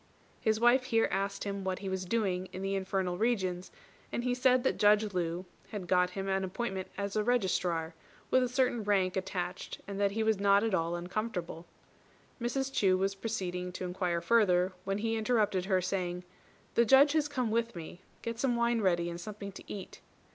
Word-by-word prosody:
His 220 -2 +1
wife 240 +2 +5
here 225 -2 +2
asked 195 0 -1
him 200 -1 -3
what 190 -1 -1
he 200 - -6
was 190 -1 -2
doing 185 -3 0
in 190 - -6
the 195 0 -1
infernal 190 -2 -1
regions; 185 -6 0 0.4
and 240 - -2
he 250 0 +1
said 250 0 +3
that - - 0
Judge 210 0 +4
Lu 175 0 -2 0.2
had 200 -5 -6
got 180 0 +3
him 195 0 -2
an 190 0 0
appointment 190 0 -3
as 200 +1 -3
Registrar, 185 -7 +1 0.4
with 255 - +5
a 250 - +1
certain 250 -3 +1
rank 195 -3 +2
attached, 185 -1 -4
and 200 0 -5
that 200 - +4
he 220 +1 0
was 220 -2 +2
not 200 +1 +4
at 225 -3 0
all 170 -1 +1
uncomfortable. 175 -2 -4 0.7
Mrs. 270 +3 -1
Chu 190 -6 +3
was 195 +1 0
proceeding 185 -4 -3
to 185 - -4
inquire 180 -1 -1
further, 185 -3 +3
when 195 0 -1
he 225 +2 -1
interrupted 215 -5 +1
her, 190 -2 +2
saying, 180 -1 -2 0.5
"The 235 - +5
Judge 270 +5 +6
has 310 -1 +2
come 255 -6 -1
with 230 0 0
me; 170 +1 -8 0.2
get 230 0 -4
some 245 -1 +1
wine 235 -1 +2
ready 175 -3 +2
and 170 0 -5
something 205 0 -7
to 195 - -11
eat." 195 -2 -8
195 Hz, 190 wpm, -31 LUFS, 185-225 Hz, 0.7 s, Judge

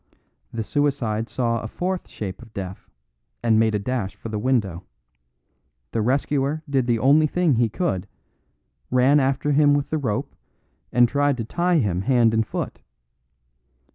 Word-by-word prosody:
The 115 -1 -3
suicide 120 -5 -1
saw 115 -2 -1
a 110 - -5
fourth 180 +9 -3
shape 95 -1 -6
of 115 -2 -15
death, 95 -1 -7 0.5
and 110 -2 +4
made 110 -1 +2
a - - +3
dash 105 -2 -3
for 115 - -8
the 105 -1 -3
window. 105 -8 0 1.1
The 115 - 0
rescuer 140 +5 0
did 135 -3 0
the 120 -1 +2
only 145 +6 +4
thing 175 -1 +2
he 115 -1 +2
could 105 - -2 0.8
ran 130 +4 +4
after 135 +2 +1
him 145 0 +5
with 145 -1 -2
the 155 - 0
rope 110 -7 -2 0.6
and 120 0 +5
tried 145 +1 +1
to 115 - -3
tie 175 +7 +1
him 100 - 0
hand 120 -1 +3
and 110 -1 +1
foot. - - -5
125 Hz, 160 wpm, -23 LUFS, 110-145 Hz, 1.1 s, him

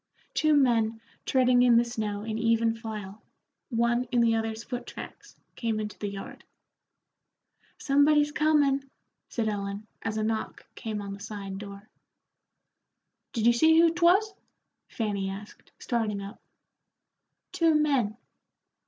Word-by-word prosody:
Two 310 -1 +3
men 230 -5 +2 0.3
treading 250 -1 +4
in 245 -2 +6
the 235 - +4
snow 215 -3 -3
in 220 0 -4
even 230 0 +2
file, 215 -3 -7 0.5
one 240 0 +1
in 245 0 0
the 230 -1 +4
other's 225 0 -2
foot 245 0 -6
tracks, - - -10 0.2
came 225 -2 -1
into 210 -1 -5
the 205 - -3
yard. 195 0 -8 1.3
"Somebody's 295 +1 +3
comin'," 290 -3 +2 0.4
said 230 -2 -1
Ellen, 200 0 -3 0.2
as 220 -1 -3
a 215 - 0
knock, 220 0 -3
came 215 -3 -5
on 200 0 -6
the 200 - -9
side 200 -2 -6
door. 200 0 -10 1.4
"Did 225 -3 -1
you 240 - +6
see 320 +7 +5
who 335 0 +5
'twas?" 365 +5 +3 0.5
Fanny 200 -4 -2
asked, 200 +2 -10
starting 220 -4 -1
up. 200 +3 -9 1.1
"Two 330 -4 +3
men." 270 -8 +1
230 Hz, 135 wpm, -28 LUFS, 210-270 Hz, 1.4 s, in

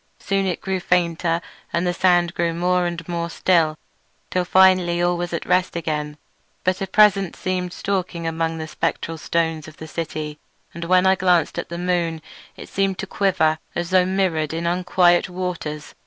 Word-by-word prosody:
Soon 195 -1 -1
it 180 - -2
grew 190 -1 -2
fainter 170 -1 +1 0.3
and 170 +1 0
the 175 - +1
sand 175 -1 +3
grew 170 -1 -1
more 180 +1 +1
and 170 -1 -5
more 170 -1 -2
still, 165 -3 +2 0.5
till 180 -1 0
finally 185 -2 +4
all 175 0 +2
was 175 0 -3
at 170 - -3
rest 180 0 +1
again; 150 -3 -3 0.5
but 185 +1 0
a 195 - -1
presence 195 -1 +4
seemed 180 -1 -2
stalking 185 -3 -3
among 165 0 -1
the 160 0 -5
spectral 165 +1 -3
stones 160 -1 -1
of 155 - -13
the 160 - -8
city, 155 -2 -5 0.3
and 170 0 -6
when 185 +1 +4
I 190 - +6
glanced 180 -3 +2
at - - -5
the 170 - -5
moon 175 -2 -1 0.4
it - - -9
seemed 195 -1 0
to - - -4
quiver 180 -6 +1 0.2
as 175 +1 -3
though 185 -1 +4
mirrored 170 -5 0
in 165 +1 -3
unquiet 175 0 +3
waters. 175 -5 -5
175 Hz, 180 wpm, -22 LUFS, 165-185 Hz, 0.5 s, I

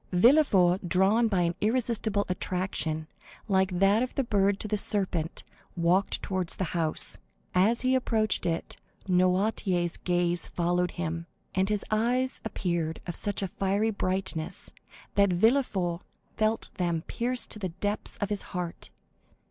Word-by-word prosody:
Villefort, 190 - +5
drawn 200 +6 +3
by 195 -5 +1
an 170 0 +1
irresistible 220 -2 +1
attraction, 180 -4 -2 0.4
like 190 -2 +1
that 195 +4 +4
of 255 - -3
the 275 - +1
bird 200 -3 +1
to - - -2
the 210 - 0
serpent, 190 -6 -1 0.3
walked 175 +4 +1
towards 185 -3 0
the - - -2
house. 165 -3 +3 0.3
As 205 +6 +3
he 255 0 +2
approached 220 -7 +1
it, 165 0 -3 0.3
Noirtier's 185 -1 +1
gaze 175 -1 0
followed 175 +1 0
him, 170 -1 -3 0.3
and 190 +1 +1
his 210 -1 -1
eyes 245 +4 +1
appeared 170 -6 -2
of 175 - -4
such 205 -1 -2
a - - 0
fiery 200 +4 0
brightness 185 -5 -3 0.4
that 200 -1 +4
Villefort 190 -4 +1 0.3
felt 220 +1 0
them 170 -2 0
pierce 245 +1 -1
to 215 - -7
the 190 -3 -2
depths 205 +5 -4
of 205 -1 -3
his 205 - -1 0.2
heart. 175 -2 -4
190 Hz, 140 wpm, -28 LUFS, 175-215 Hz, 0.4 s, Villefort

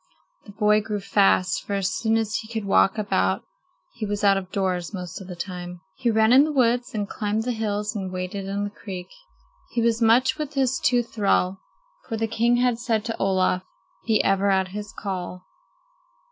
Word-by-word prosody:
The - - -9
boy 210 +1 +3
grew 210 -1 -3
fast, 195 -2 +2
for 205 - -5
as 195 -1 0
soon 225 0 +1
as 220 -1 -1
he 220 - -7
could 220 -3 -3
walk 195 +1 +3
about 210 -1 0 0.5
he - - -8
was 205 0 -2
out 200 -1 +6
of 190 -1 -4
doors 185 -1 -1
most 180 0 -6
of 190 - -10
the 180 - -7
time. 180 0 -6 0.2
He 250 -3 0
ran 220 +1 +4
in 270 +2 +8
the 310 - -1
woods 245 -3 +1
and 205 -1 -1
climbed 210 +2 -2
the 250 - -1
hills 210 -2 -2
and 190 -3 -4
waded 185 +2 -4
in 200 +1 -2
the 205 - -3
creek. 185 -4 -8 0.6
He 235 - +1
was 230 0 +1
much 245 +6 +4
with 300 -1 -4
his 265 -2 +1
tooth 240 -2 +1
thrall, 195 -3 +1 0.5
for 225 - -2
the 225 - 0
king 230 +2 +2
had 245 -1 +2
said 225 -3 -1
to 225 - -3
Olaf: 185 -1 +2 0.5
"Be 220 -2 +3
ever 195 +1 +2
at 190 -1 +2
his 210 +2 -6
call." 185 -2 -5
210 Hz, 200 wpm, -24 LUFS, 195-225 Hz, 0.6 s, in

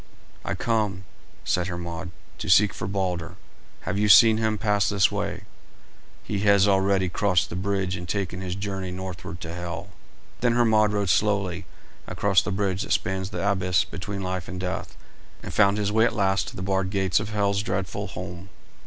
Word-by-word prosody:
"I - - -2
come," 105 -5 -1 0.4
said 90 0 0
Hermod, 85 0 -5 0.3
"to - - -4
seek 95 +1 +5
for 95 - -5
Balder. 90 -4 -2 0.5
Have 100 - -2
you 105 0 +2
seen 110 +3 +8
him 110 -1 0
pass 105 -1 +1
this 100 -2 +3
way?" - - -3 0.8
"He 105 - -3
has 100 -1 +4
already 95 -1 +2
crossed 90 -1 +1
the - - -4
bridge 95 0 -1
and 90 -2 -7
taken 95 -2 -2
his 90 -1 -3
journey 95 -1 -4
northward 90 -2 -6
to 85 0 -6
Hel." 85 +2 -6 0.5
Then 120 -1 +2
Hermod 110 -3 +4
rode 100 -3 +1
slowly 100 -4 0 0.4
across 100 -2 +2
the - - -4
bridge 95 -1 -1
that - - -1
spans 95 0 -1
the 100 - -3
abyss 90 -3 +2
between 100 +2 -6
life 90 -1 -3
and 95 0 -6
death, 90 0 -4 0.5
and - - -6
found 100 -1 +4
his 105 -1 0
way 110 +1 +4
at 115 - 0
last 95 -1 +1
to 120 - -8
the 95 - -5
barred 95 0 0
gates 95 -3 +1
of - - -5
Hel's 100 -1 +1
dreadful 100 -4 -3
home. 90 +2 -8
95 Hz, 180 wpm, -25 LUFS, 90-105 Hz, 0.8 s, seen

